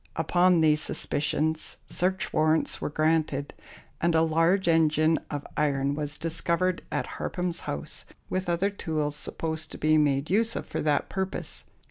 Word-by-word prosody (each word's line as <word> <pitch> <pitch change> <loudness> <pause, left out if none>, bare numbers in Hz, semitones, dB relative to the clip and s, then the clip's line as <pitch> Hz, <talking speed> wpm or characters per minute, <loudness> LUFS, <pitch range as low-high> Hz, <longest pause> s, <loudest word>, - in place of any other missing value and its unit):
Upon 175 +2 +3
these 155 -1 +4
suspicions 155 +2 -1
search 185 +1 -1
warrants 155 0 +2
were - - -1
granted, 155 -2 0 0.5
and 170 0 +2
a 160 - +5
large 165 +4 +2
engine 160 -1 +3
of 145 -1 -4
iron 140 -2 +1
was 145 0 -3
discovered 170 +2 0
at - - -1
Harpham's 180 -2 -3
house, 70 - -5 0.2
with 185 -1 -2
other 180 +4 +1
tools 155 -6 -2
supposed 160 +1 -3
to - - -7
be 155 0 +3
made 140 +1 +1
use 225 +3 +2
of - - -3
for - - -4
that 150 -2 +1
purpose. 190 -1 -4
160 Hz, 150 wpm, -27 LUFS, 150-175 Hz, 0.5 s, a